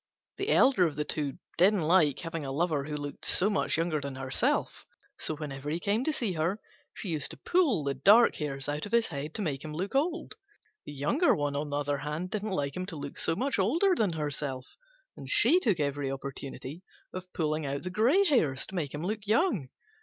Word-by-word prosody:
The 395 +2 -2
elder 255 - +5
of 155 - -6
the 150 - -1
two 145 -3 -2 0.2
didn't 190 0 +4
like 155 -4 +4
having 165 -2 -5
a 135 - -4
lover 150 -1 0
who 150 0 -4
looked 145 -1 -7
so 200 +4 +4
much 200 - +1
younger 165 -2 0
than 140 -1 -5
herself; 130 0 -1 0.4
so, 155 - -1
whenever 145 -2 -6
he 160 +3 -1
came 205 +6 0
to 315 - +2
see 235 -10 -1
her, 170 +6 -1 0.4
she 195 - -5
used 155 -4 0
to - - -9
pull 315 - +2
the 140 0 -1
dark 205 - +6
hairs 135 -3 -3
out 150 +5 -2
of 205 - -12
his 235 -1 +3
head 150 0 -5
to 215 - -1
make 145 -5 -3
him 155 -1 -6
look 190 +5 -3
old. 320 +6 0 0.5
The - - -6
younger, 190 - +2
on 145 -1 -1
the 145 0 -3
other 145 -1 -1
hand, 150 +5 -4
didn't 215 0 -2
like 145 -7 -2
him 185 0 -4
to 185 - -6
look 145 -1 -6
so 165 - +2
much 265 +2 -1
older 330 - +3
than 210 - +1
herself, 145 -4 -4 0.4
and - - -9 0.3
took 205 - +1
every 140 -1 -1
opportunity 135 +2 -6 0.3
of 185 0 -7
pulling 155 -2 -1
out 140 +1 -3
the 180 - -4
grey 245 - +4
hairs, 160 - +2
to - - -13
make 150 -5 -3
him 150 - -5
look 210 +1 -3
young. 215 - +1
160 Hz, 215 wpm, -29 LUFS, 145-205 Hz, 0.5 s, dark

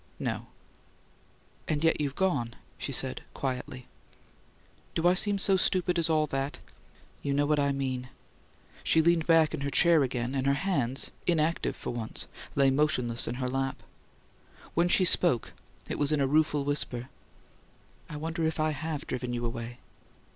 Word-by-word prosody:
"No." - - -3 1.2
"And 155 0 0
yet 160 -1 +3
you've 140 -2 -2
gone," 140 - 0 0.2
she - - -4
said, - - -3
quietly. 130 -1 -4 1.1
"Do 165 +1 +2
I 180 - +6
seem 200 +2 +2
so 195 -1 +3
stupid 180 -1 +2
as 165 0 +1
all 155 -1 +3
that?" 135 -1 -3 0.6
"You 140 -1 -1
know 145 +1 +3
what 150 0 +2
I 140 0 +2
mean." 130 -2 -3 0.7
She 160 - +3
leaned 170 -1 +3
back 165 -2 +5
in - - -3
her 140 - -1
chair 165 +3 +5
again, 125 -1 -1
and 135 0 0
her 140 - +4
hands, 140 -6 0 0.2
inactive 165 -1 +1
for - - -5
once, 115 -2 -3 0.3
lay 135 -1 +4
motionless 130 -5 +1
in 120 - -2
her 130 0 -2
lap. 135 +1 -2 0.9
When 170 +1 +3
she 185 +1 +4
spoke 170 -8 +3 0.3
it - - -4
was 145 0 +2
in 150 - +2
a 140 - +3
rueful 150 0 +2
whisper: 130 -3 -2 1.0
"I 150 - -6
wonder 165 +2 -3
if 160 0 0
I 155 0 +2
HAVE 155 0 -4
driven 125 -1 -3
you 120 0 -2
away?" 115 0 -5
145 Hz, 165 wpm, -29 LUFS, 130-160 Hz, 1.2 s, I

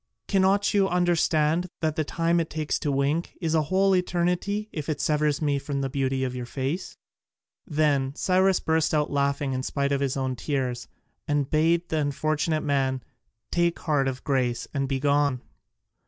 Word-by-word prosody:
Cannot 195 +1 +2
you 195 -2 +3
understand 175 -1 +2
that 155 -2 0
the 160 - 0
time 165 +3 +1
it 165 - -2
takes 155 -1 -2
to 145 - -1
wink 140 +5 -1
is 165 -3 -1
a 160 - +4
whole 190 +5 +2
eternity 180 +4 0
if 150 -1 -5
it 150 - -1
severs 150 0 +1
me 145 -2 +1
from 140 0 -3
the 135 -1 -2
beauty 135 -1 0
of 125 -1 -2
your 125 -1 -5
face?" 140 +8 -4 0.7
Then 145 -4 +1
Cyrus 185 +2 +3
burst 160 0 +1
out 150 -1 +1
laughing 140 -1 0
in 130 - -1
spite 140 +1 -1
of 140 -1 +1
his 140 0 0
own 130 -1 -1
tears, 125 -3 -2 0.4
and 145 -2 +1
bade 165 +3 +2
the 160 - 0
unfortunate 155 +2 0
man 135 -3 0 0.5
take 170 0 +1
heart 145 -4 0
of 130 -1 -4
grace 125 -4 0
and 135 -2 -1
be 135 -1 0
gone. 140 -2 +1
150 Hz, 175 wpm, -26 LUFS, 135-170 Hz, 0.7 s, a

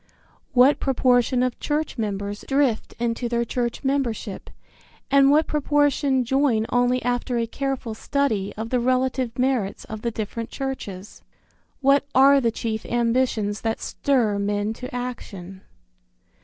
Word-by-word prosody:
What 260 +3 +5
proportion 250 -1 +2
of 255 -1 -2
church 305 +1 -2
members 205 -1 -3
drift 270 -5 0
into 235 +1 -2
their 235 0 0
church 240 +1 -3
membership, 245 -7 -2 0.6
and 275 0 +6
what 305 +2 +4
proportion 290 -3 +1
join 260 -3 +2
only 245 0 +2
after 245 0 -1
a 230 - +1
careful 265 -1 -3
study 220 -5 -1
of 225 +1 -5
the 250 - +2
relative 255 0 0
merits 250 -6 0
of 220 -1 -7
the 235 - -1
different 225 +1 -5
churches? 210 -8 -6 0.6
What 275 +1 +3
are 275 +1 +6
the 235 - +2
chief 220 -1 -3
ambitions 235 -3 0
that 225 0 -1
stir 235 -8 0
men 205 +1 -1
to 250 +2 -8
action? 195 -7 -6
245 Hz, 135 wpm, -23 LUFS, 220-270 Hz, 0.6 s, and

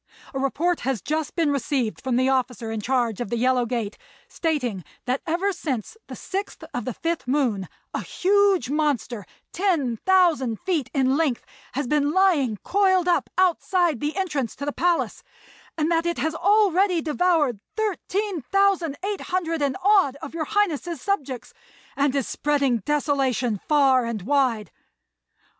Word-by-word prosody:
A 270 - -2
report 320 +6 0
has 265 -3 -1
just 310 - -3
been 325 -4 +2
received 270 -4 -1
from 255 -2 -1
the 255 +1 +3
officer 250 -4 0
in 220 -1 -3
charge 240 -2 0
of 240 - -3
the 235 - -1
Yellow 250 0 +2
Gate 225 -4 -3 0.3
stating 250 - -2 0.2
that, 255 +2 -1
ever 365 +5 0
since 275 - -4
the - - -7
6th 390 +2 -5
of 245 - -3
the 255 - -3
5th 330 -5 -3
moon, 245 - 0 0.2
a - - -2
huge 395 -5 +2
monster, 265 -8 -1 0.3
10,000 325 - +2
feet 315 -9 -1
in 265 -1 +3
length, 300 -7 0 0.3
has 280 +2 -1
been 290 +2 +1
lying 325 - +3
coiled 375 -3 +2
up 350 - +2
outside 355 -4 +2
the 295 +4 -2
entrance 295 - -2
to 280 - -5
the 290 - -2
palace, 350 -1 0 0.6
and 315 +1 +1
that 335 0 +2
it 340 - -1
has 320 +1 -1
already 380 -1 +3
devoured 305 - +1 0.2
13,800 380 - -1
and 275 -2 0
odd 385 -9 +4
of 285 - -9
your 325 -2 -2
Highness's 350 -6 0
subjects, 270 -9 -3 0.4
and 280 -1 +1
is 275 -4 0
spreading 280 -4 +1
desolation 265 - 0
far 270 -4 +4
and 225 -5 -4
wide. 255 -3 +1
290 Hz, 150 wpm, -24 LUFS, 255-355 Hz, 0.6 s, odd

